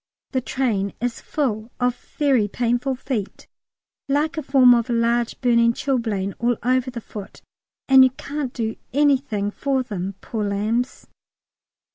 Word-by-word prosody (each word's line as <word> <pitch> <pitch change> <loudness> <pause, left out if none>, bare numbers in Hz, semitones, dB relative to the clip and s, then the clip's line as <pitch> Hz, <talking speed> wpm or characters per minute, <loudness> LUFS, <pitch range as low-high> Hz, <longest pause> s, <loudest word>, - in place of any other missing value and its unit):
The 260 - 0
train 225 -7 -1
is 245 0 -3
full 225 -7 -2
of 245 -1 +1 0.2
very 270 -8 +3
painful 245 +4 0
feet: 245 -6 -4 0.6
like 295 +3 +1
a 310 - -2
form 265 -3 +6
of 235 -1 +1
large 235 0 +1
burning 235 -2 +4
chilblain 225 -8 -1
all 240 -1 +1
over 255 +1 +1
the 245 -2 -6
foot, 205 -2 -10 0.4
and 265 -1 +8
you 260 - +6
can't 275 +1 -5
do 225 -2 -3 0.2
anything 265 -8 +2
for 270 +2 -1
them, 195 -4 -5
poor 220 +1 -4
lambs. 215 +5 -1
245 Hz, 140 wpm, -22 LUFS, 220-265 Hz, 0.6 s, and